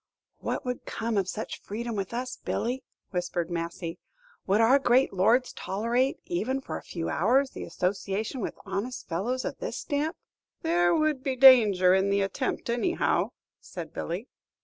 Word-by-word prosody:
"What - - -3
would 250 0 -3
come 230 0 -2
of 195 -2 +1
such 220 - -5
freedoms 230 +2 -4
with 195 -2 -3
us, 250 +2 -3
Billy?" 250 +3 -2 0.3
whispered 175 -2 -2
Massy. 170 0 -4 0.5
"Would 200 +3 +3
our 240 +5 +6
great 255 -2 +3
lords 230 +7 +3
tolerate, 235 +7 0
even 220 +10 -1
for 270 - -6
a - - -5
few 165 -2 -5
hours, 270 +2 +2
the - - -6
association 200 +6 -2
with - - -4
honest 200 +6 -4
fellows 230 +10 -2
of - - -4
this - - -4
stamp?" 300 +3 -2 0.5
"There 175 +1 +3
would 310 -3 +1
be 265 -2 -1
danger 215 -9 +7
in 190 +1 +3
the 200 0 +2
attempt, 195 +7 -2
anyhow," 240 +10 +1 0.3
said - - -8
Billy. 180 +9 -4
225 Hz, 160 wpm, -28 LUFS, 190-255 Hz, 0.5 s, danger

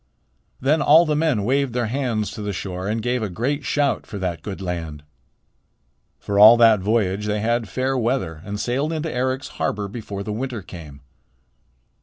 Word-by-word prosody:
Then 150 +4 +2
all 160 +4 +6
the 155 -2 0
men 150 -9 +1
waved 135 +2 +1
their 120 -1 0
hands 115 -3 -2
to 110 - -7
the 105 -1 -3
shore 95 0 -5
and 110 +1 -2
gave 125 0 0
a 105 - -2
great 135 - -2
shout 145 0 0
for 105 - -7
that 90 -3 -3
good 100 -2 -6
land. 85 -5 -5 1.1
For 100 0 -2
all 110 +3 +10
that 115 -3 +6
voyage 105 0 0
they 105 0 0
had 115 0 0
fair 130 +5 -1
weather 115 -10 -1
and 100 +1 -5
sailed 135 +8 -1
into 160 0 -3
Eric's 130 +2 -2
harbor 105 -1 -1
before 100 -2 -6
the 105 - -4
winter 120 -2 -4
came. 75 -6 -11
110 Hz, 180 wpm, -22 LUFS, 100-130 Hz, 1.1 s, all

